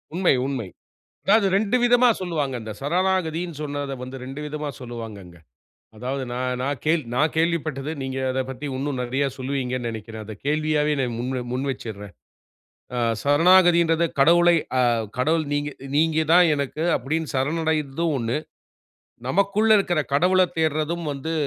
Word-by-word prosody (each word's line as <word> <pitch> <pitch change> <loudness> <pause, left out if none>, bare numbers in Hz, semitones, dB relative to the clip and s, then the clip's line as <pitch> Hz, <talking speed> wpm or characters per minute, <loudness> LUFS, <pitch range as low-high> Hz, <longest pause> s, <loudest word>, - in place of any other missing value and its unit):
உண்மை, 180 -3 +3
உண்மை. 130 -8 -3 0.6
அதாவது 210 +1 +4
2 210 +3 +2
விதமா 245 +1 +5
சொல்வாங்க. 155 -7 -2
இந்த 110 - -6
சரணாகதின்னு 175 0 0
சொன்னத 145 -1 -4
வந்து 130 +1 -7
2 135 +3 -7
விதமா 150 0 -4
சொல்லுவாங்கங்க. 110 -7 -8 0.6
அதாவது 130 +4 -3
நான் 125 0 -2
நான் 140 0 -2
கேள் 160 +1 +3
நான் 150 +5 +1
கேள்விப்பட்டது, 155 -4 0
நீங்க 130 0 -4
அதப் 130 0 -2
பத்தி 135 +3 -6
இன்னும் 135 -1 -3
நெறைய 130 +3 0
சொல்லுவீங்கணு 130 -2 -2
நெனைக்கிறேன். 110 -1 -6
அத 110 - -7
கேள்வியாவே 150 0 +1
நான் 125 -3 -1
முன் 125 +2 -3
வ - - -2
முன் 130 +2 -2
வச்சர்றேன். 105 -6 -8 0.8
ஆ - - -1 0.2
சரணாகதின்றத 170 +2 +5 0.2
கடவுளை 170 +3 +6 0.2
ஆ - - +4 0.4
கடவுள் 160 +4 +2
"நீங்க 145 0 -1 0.2
நீங்க 160 +1 +2
தான் 180 +1 +7
எனக்கு" 140 +2 -3
அப்டின் 155 +5 -2
சரணடைற்தும் 155 +2 0
1. 115 +2 -1 0.9
"நமக்குள்ள 200 +8 +2
இருக்குற 175 -5 +1
கடவுளத் 180 +4 +3
தேடுறதும் 160 +2 0
வந்து, 140 +4 -4
145 Hz, 140 wpm, -23 LUFS, 130-170 Hz, 0.9 s, தான்